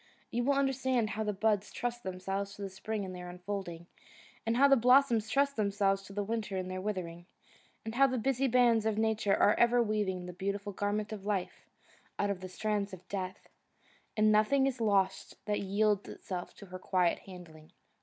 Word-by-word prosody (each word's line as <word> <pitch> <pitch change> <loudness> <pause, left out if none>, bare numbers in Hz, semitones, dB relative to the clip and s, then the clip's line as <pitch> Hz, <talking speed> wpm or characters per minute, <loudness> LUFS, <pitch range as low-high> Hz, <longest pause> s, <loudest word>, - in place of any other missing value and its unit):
You 240 +1 0
will 280 - +3
understand 260 -4 +1
how 220 - -2
the 210 - 0
buds 210 0 0
trust 240 0 -3
themselves 195 +1 -4
to 205 - -7
the 195 - -5
spring 205 +2 -4
in 185 -1 -6
their 180 -1 -7
unfolding, 180 -2 -6 0.6
and 230 +1 +1
how 280 +2 +7
the 275 - +6
blossoms 245 -3 +4
trust 280 +1 +1
themselves 200 -2 +1
to 195 - -13
the 205 +1 -1
winter 210 -2 -3
in 185 0 -3
their 185 0 -4
withering, 175 -4 -4 0.6
and 220 - -4
how 275 +3 +5
the 255 -1 -1
busy 270 +3 +1
bands 235 -3 +4
of 215 -1 0
Nature 220 -2 +2
are 205 - +4
ever 240 +1 +5
weaving 205 -4 -1
the 180 - -7
beautiful 200 +2 -3
garment 205 +2 -2
of 205 -3 -7
life 200 -3 -3 0.5
out 205 0 +1
of 195 - -4
the 185 - -6
strands 205 +1 -2
of 180 -1 -11
death, 190 -1 -5 0.7
and 215 0 +5
nothing 215 +6 +4
is 260 -3 -2
lost 195 -3 +1
that 210 0 0
yields 205 +1 +1
itself 180 -2 -6
to 200 - -12
her 185 -1 -8
quiet 180 -2 +1
handling. 165 -4 -12
205 Hz, 195 wpm, -31 LUFS, 190-225 Hz, 0.7 s, how